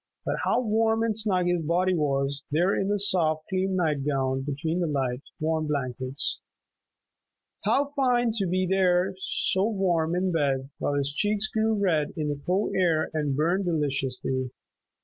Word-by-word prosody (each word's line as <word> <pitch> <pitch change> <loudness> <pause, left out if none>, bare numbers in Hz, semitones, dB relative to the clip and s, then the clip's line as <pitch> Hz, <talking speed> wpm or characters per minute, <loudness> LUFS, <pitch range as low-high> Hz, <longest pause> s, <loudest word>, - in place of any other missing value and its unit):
But - - -1
how - - +2
warm 225 0 +1
and 225 -2 0
snug 200 -5 +2
his 175 -1 +1
body 175 +4 +1
was, 140 -3 0
there 175 +6 +2
in 195 - 0
the 205 0 +1
soft, 165 -6 +2
clean 190 0 0
night 155 -6 0
gown 135 -2 0
between 150 +5 -2
the 175 - 0
light, 135 -4 -1 0.2
warm 155 0 0
blankets! 130 -1 -2 1.3
How 285 +1 +1
fine 245 -4 +2
to 195 -3 0
be 185 +2 +1
there 185 -1 +2
so 190 +2 0
warm 175 -5 +1
in 185 +1 0
bed 140 -4 0
while 145 - -1
his 140 0 -1
cheeks 205 +5 +1
grew 220 0 +1
red 170 -8 +1
in 150 -1 -1
the 145 -1 -4
cold 190 +4 +1
air 170 -4 +2
and 150 -3 -1
burned 175 +6 +1
deliciously. 135 -5 -1
170 Hz, 165 wpm, -26 LUFS, 145-195 Hz, 1.3 s, how